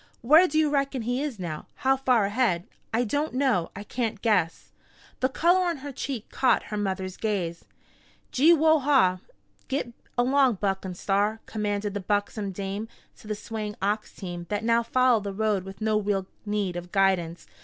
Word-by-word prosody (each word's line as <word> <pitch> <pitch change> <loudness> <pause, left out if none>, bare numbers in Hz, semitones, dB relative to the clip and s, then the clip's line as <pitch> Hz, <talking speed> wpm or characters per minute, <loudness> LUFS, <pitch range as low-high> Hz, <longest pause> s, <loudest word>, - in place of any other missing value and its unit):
Where 310 +9 +6
do 310 - -1
you 310 -2 +3
reckon 275 -3 0
he 245 +3 -1
is 290 -6 -3
now 170 -5 -5
how 265 0 +2
far 255 -5 +2
ahead?" 205 -5 +1 0.3
"I 230 +2 +2
don't 290 +4 -1
know. 255 -11 +1
I 200 - -6
can't 225 -1 -3
guess." 185 -7 +1 0.5
The 260 - +2
color 350 +6 +3
on 345 -3 -1
her 285 - -4
cheek 260 -3 -5
caught 260 - +2
her - - 0
mother's 190 -2 -3
gaze. 180 -6 -2 0.7
"Gee 300 +6 +5
whoa 315 -1 +5
haw! 255 -11 +3 0.5
Git 265 -3 -2 0.2
along 260 0 +3
Buck 195 -1 -1
and 180 -2 -6
Star!" 205 +3 +1
commanded 205 -1 -2
the 205 - -2
buxom 205 +1 -1
dame 200 +3 -4 0.3
to - - -15
the 215 - -2
swaying 210 0 -5
ox 210 +2 -1
team 175 -3 -6
that 205 +1 -2
now 230 +1 +3
followed 240 -2 +2
the 200 - -3
road 210 -2 0
with 195 +1 -10
no 215 -1 +2
real 200 -2 -1 0.2
need 205 -3 -1
of 175 0 -6
guidance. 185 -4 +1
215 Hz, 180 wpm, -26 LUFS, 195-255 Hz, 0.7 s, Where